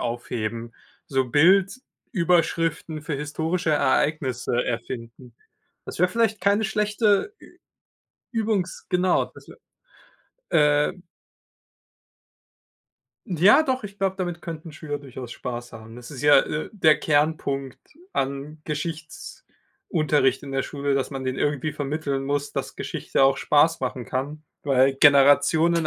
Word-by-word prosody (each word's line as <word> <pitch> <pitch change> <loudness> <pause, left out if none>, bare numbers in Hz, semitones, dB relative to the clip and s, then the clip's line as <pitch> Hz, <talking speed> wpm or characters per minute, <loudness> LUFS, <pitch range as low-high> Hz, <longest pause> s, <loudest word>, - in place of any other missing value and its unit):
aufheben, 115 -1 -4 0.3
so 135 -5 0
Bildüberschriften 170 - +1
für 150 -1 -3
historische 160 +4 -2
Ereignisse 130 -4 +1
erfinden. 120 0 -6 0.5
Das - - -8
wäre 180 +2 +4
vielleicht 220 0 0
keine 200 +3 +2
schlechte 210 - +1
Ü - - -16 0.8
übungs 215 -5 -2
genau, 180 0 +2
das - - -17
wä - - -12 1.0
ähm 150 +3 +2 2.2
Ja 190 - +5
doch, 260 -5 -2
ich 200 -1 -8
glaube, 190 -1 0
damit 175 -2 -4
könnten 165 0 -7
Schüler 145 -1 -6
durchaus 130 -3 -9
Spaß 120 -1 -6
haben. 115 0 -11
Das 125 -1 -11
ist 135 -4 -8
ja, 145 0 +6
äh, 150 - -4
der 155 -7 +4
Kernpunkt 145 -3 0 0.3
an 140 +3 -3
Geschichtsunterricht 155 -2 -3
in 140 -1 -8
der 135 - 0
Schule, 140 -1 -2
dass 135 - -1
man 135 -2 -5
denen 130 0 -2
irgendwie 145 0 -1
vermitteln 145 -1 -3
muss, 145 0 -2
dass - - -4
Geschichte - - 0
auch 135 0 +3
Spaß 155 +2 +3
machen 125 -1 -3
kann, 145 +5 -4 0.2
weil 135 -1 +3
Generationen 150 +4 +5
150 Hz, 125 wpm, -24 LUFS, 135-170 Hz, 2.2 s, ja